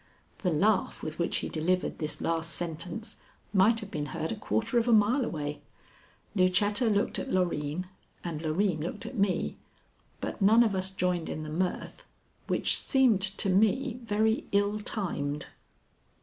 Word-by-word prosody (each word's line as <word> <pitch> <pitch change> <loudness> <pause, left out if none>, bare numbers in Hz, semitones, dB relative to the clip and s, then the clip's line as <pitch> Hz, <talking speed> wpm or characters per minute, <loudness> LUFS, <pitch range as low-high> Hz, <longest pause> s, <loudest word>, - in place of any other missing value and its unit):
The 185 - 0
laugh 190 +5 +1
with 155 +1 -5
which 170 - 0
he - - -2
delivered 180 +3 -1
this 155 -2 -2
last 165 0 -1
sentence 175 +6 -5 0.4
might 210 +4 +4
have 210 - -8
been 150 -1 -3
heard 155 +4 -3
a - - -2
quarter 225 +2 0
of 230 - -1
a - - +4
mile 225 +5 +4
away. 150 -7 -4 0.7
Lucetta 205 +5 +3
looked 205 +2 +1
at 270 - -5
Loreen 175 -2 0 0.4
and 165 -3 -4
Loreen 165 +2 0
looked 175 +6 -4
at - - -6
me, 195 -5 0 0.6
but - - -5
none 220 +4 +6
of 220 -3 +1
us 190 0 -1
joined 180 -3 -1
in 155 - -4
the 155 - -6
mirth, 180 +4 -3 0.4
which - - +2
seemed 255 -8 +3
to 195 0 +2
me 225 +6 +2
very 220 0 +1
ill 205 +1 +2
timed. 150 -9 -2
190 Hz, 160 wpm, -29 LUFS, 165-215 Hz, 0.7 s, none